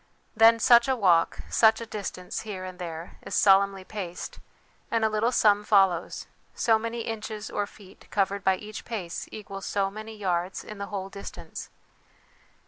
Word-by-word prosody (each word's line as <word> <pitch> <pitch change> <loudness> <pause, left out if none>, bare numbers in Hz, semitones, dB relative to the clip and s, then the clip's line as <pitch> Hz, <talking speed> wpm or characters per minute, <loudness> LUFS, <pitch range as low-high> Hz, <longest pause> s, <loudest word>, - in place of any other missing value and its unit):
Then 225 +1 +7
such 235 +1 +6
a 265 - +2
walk, 180 -7 +3
such 220 -1 +4
a 230 - -5
distance, 195 -4 -5
here 195 -4 -6
and 185 0 -9
there, 165 -1 -7
is - - -5
solemnly 195 -1 +4
paced, 185 -3 -6 0.5
and 230 -1 +1
a - - +3
little 215 +3 +1
sum 210 -4 +4
follows 190 -5 +2 0.3
so 225 -1 +3
many 230 +1 -4
inches 220 -1 -5
or 205 -1 -1
feet 200 -2 -17
covered 200 0 0
by 190 -1 +4
each 210 +2 -8
pace 195 -8 -5
equals 195 -2 -7
so 195 -1 0
many 215 +1 -8
yards 180 -2 -1
in 210 -1 -9
the 200 - -4
whole 195 -2 -5
distance. 200 0 -8
205 Hz, 165 wpm, -27 LUFS, 190-220 Hz, 0.5 s, Then